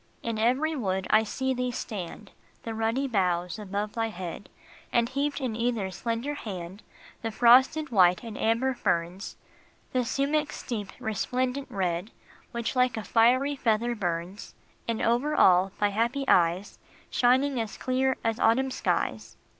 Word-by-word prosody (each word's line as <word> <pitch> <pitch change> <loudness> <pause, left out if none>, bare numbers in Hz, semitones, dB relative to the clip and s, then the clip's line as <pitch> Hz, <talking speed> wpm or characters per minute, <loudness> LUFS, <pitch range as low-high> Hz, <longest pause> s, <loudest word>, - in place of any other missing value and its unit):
In 230 -2 -2
every 265 +8 +2
wood 190 -7 -1
I 215 - +6
see 265 +4 -2
thee 250 0 -1
stand, 210 -3 -6 0.3
The 225 - -4
ruddy 225 +5 0
boughs 180 -4 0
above 205 +1 -3
thy 225 -1 -1
head, 185 -2 -7 0.4
And 235 -1 +2
heaped 280 +3 -2
in 255 -5 -2
either 230 -4 -1
slender 230 +8 -3
hand 190 -6 -7 0.4
The 225 - -2
frosted 260 +6 +4
white 180 -1 +4
and 225 -2 -7
amber 230 +5 +1
ferns, 175 -3 -2 0.6
The 255 - +2
sumach 290 +5 0
s - - -8
deep, 210 -5 -4
resplendent 255 +5 -2
red, 180 0 -2 0.4
Which 235 +2 -3
like 250 -2 +2
a 220 - -3
fiery 255 +7 +3
feather 235 -1 +1
burns, 180 -2 -4 0.3
And 230 -1 -1
over 250 +6 +1
all, 185 +1 +5
thy 205 - +3
happy 235 +7 0
eyes, 175 +3 +2 0.3
Shining 260 +1 +3
as 220 -2 -6
clear 260 +1 0
as 225 0 0
autumn 265 +4 +3
skies. - - -2
230 Hz, 150 wpm, -27 LUFS, 200-255 Hz, 0.6 s, I